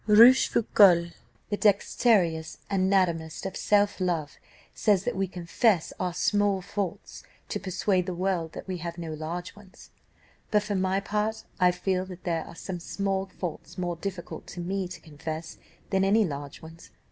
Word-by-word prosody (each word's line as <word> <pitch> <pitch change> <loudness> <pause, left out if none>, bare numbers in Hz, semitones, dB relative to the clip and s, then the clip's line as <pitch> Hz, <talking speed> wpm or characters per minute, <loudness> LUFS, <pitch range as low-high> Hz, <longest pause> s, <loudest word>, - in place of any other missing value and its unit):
Rochefoucault, 210 -6 +6 0.4
the 205 - +1
dexterous 195 -5 +2
anatomist 185 -5 +1
of 190 - -4
self 205 -1 +2
love, 165 -5 -1 0.4
says 205 -4 +2
that - - -2
we 195 0 0
confess 180 +1 +1
our 180 -1 0
small 205 +2 +2
faults, 190 0 -5 0.3
to - - -2
persuade 185 0 0
the 185 - -2
world 180 -3 -1
that - - -8
we 185 -1 -3
have 170 0 -6
no 165 -2 -5
large 170 +5 -5
ones. 210 0 -16 0.6
But, 210 -1 +3
for 210 0 -3
my 190 0 +1
part, 215 +2 -2 0.2
I 180 -1 +6
feel 185 +1 -1
that 185 -1 -10
there 165 -2 -1
are - - -11
some 180 +1 -5
small 195 +2 -2
faults 180 -3 -7
more 175 -1 -2
difficult 180 0 -6
to - - -8
me 185 +2 -2
to 180 - -9
confess 160 +1 -7 0.3
than 190 -1 +2
any 210 +3 +4
large 145 -3 -6
ones. 160 +1 -12
185 Hz, 160 wpm, -27 LUFS, 170-200 Hz, 0.6 s, Rochefoucault